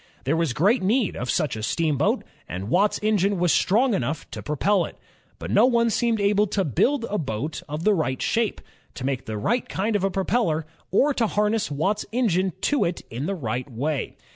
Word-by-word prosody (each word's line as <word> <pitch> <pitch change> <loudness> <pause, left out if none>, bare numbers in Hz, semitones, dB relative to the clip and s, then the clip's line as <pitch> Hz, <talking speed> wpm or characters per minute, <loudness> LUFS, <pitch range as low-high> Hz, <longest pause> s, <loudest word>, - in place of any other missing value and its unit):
There 140 +5 +1
was 165 -4 +1
great 205 - +3
need 215 +3 +1
of 125 - -4
such 150 -8 0
a 110 - -5
steamboat, 150 +6 +1 0.3
and 95 +5 -5
Watt's 200 - +3
engine 205 -2 +2
was 175 -1 +2
strong 235 +6 +3
enough 155 -1 -2
to - - -6
propel 180 +6 +1
it. - - -11 0.4
But - - -6
no - - +5
one 235 -2 +2
seemed 230 0 +1
able 205 +1 +3
to 195 -1 0
build 230 - +1
a 210 - -2
boat 140 +2 -3
of 150 +2 -4
the 215 - +4
right 140 -8 -1
shape, 230 -2 0 0.3
to 130 - -5
make 135 -2 -2
the 110 -1 -3
right 235 - 0
kind 210 +3 -1
of 200 - +1
a 195 - +2
propeller, 190 -4 0 0.2
or 280 +9 +3
to 230 -4 +1
harness 210 +1 0
Watt's 190 +9 0
engine 190 -7 +1
to 290 - +2
it 170 0 -2
in 125 +7 -3
the 195 - -1
right 125 -3 -4
way. 140 +4 -3
190 Hz, 205 wpm, -24 LUFS, 145-215 Hz, 0.4 s, no